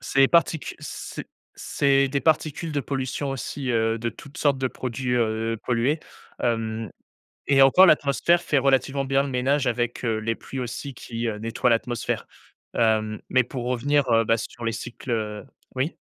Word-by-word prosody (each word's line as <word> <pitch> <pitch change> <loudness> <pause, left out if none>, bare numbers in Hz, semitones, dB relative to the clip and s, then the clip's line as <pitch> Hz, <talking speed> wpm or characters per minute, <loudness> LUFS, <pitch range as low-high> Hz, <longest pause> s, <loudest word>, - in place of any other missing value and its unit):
Ces 135 +1 +3
particu 165 -4 +2
c'est - - -7 0.3
c'est 140 -1 +2
des 140 +1 -1
particules 160 0 0
de 145 - 0
pollution 135 +1 -3
aussi, 135 0 -4
heu, 115 0 +1
de 115 +1 -2
toutes 145 -1 -13
sortes 140 -3 +2
de 130 -1 0
produits, 125 0 -3
heu, 115 -1 0
pollués, 125 +6 +1 0.4
hem, 115 -2 -1 0.6
et 135 -1 +6
encore 180 +8 +7
l'atmosphère 155 +2 +3
fait 145 - +2
relativement 135 +1 +2
bien 135 +1 +2
le - - -4
ménage 135 +2 +1
avec, 120 +1 -1
heu, 110 -2 0
les 115 +1 -1
pluies 135 - -7
aussi 130 +3 -5
qui, 115 -1 -5
heu, 105 - -3
nettoient 115 +3 0
l'atmosphère, 115 0 -1 0.5
hem, 110 -2 +1
mais 130 0 +4
pour 125 0 -6
revenir, 135 +3 +1
heu, 115 - +5
bah, 115 - +3
sur 115 +1 -7
les 115 - +1
cycles 110 -2 -4 0.3
oui. 135 +6 -1
125 Hz, 170 wpm, -24 LUFS, 115-140 Hz, 0.6 s, encore